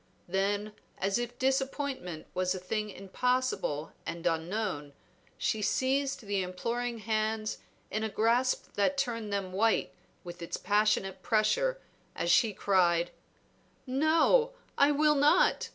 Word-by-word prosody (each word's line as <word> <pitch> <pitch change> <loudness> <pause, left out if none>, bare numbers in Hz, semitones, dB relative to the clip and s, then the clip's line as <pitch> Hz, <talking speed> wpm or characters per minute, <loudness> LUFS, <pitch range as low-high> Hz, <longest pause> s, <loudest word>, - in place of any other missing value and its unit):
Then 200 +3 -1 0.2
as 195 +4 0
if 240 0 -4
disappointment 265 - -1
was 185 0 0
a - - -4
thing 210 +3 -3
impossible 195 - -1
and 170 +1 -6
unknown, 165 -3 -1 0.4
she 220 - 0
seized 270 +5 0
the 200 -3 -1
imploring 235 +6 -3
hands 215 0 -1 0.3
in 215 +1 -1
a 220 - -1
grasp 235 +5 +1
that 240 +8 +1
turned 230 -6 -2
them 195 -2 -2
white 220 +3 +2 0.3
with 175 -1 -9
its 170 - -4
passionate 205 -1 +1
pressure - - +1 0.4
as 170 - 0
she 220 +4 +5
cried 175 -4 +2 0.7
"No, 315 - +3 0.2
I 280 - +5
will 300 +1 +4
not! 290 +1 +3
215 Hz, 125 wpm, -30 LUFS, 190-255 Hz, 0.7 s, she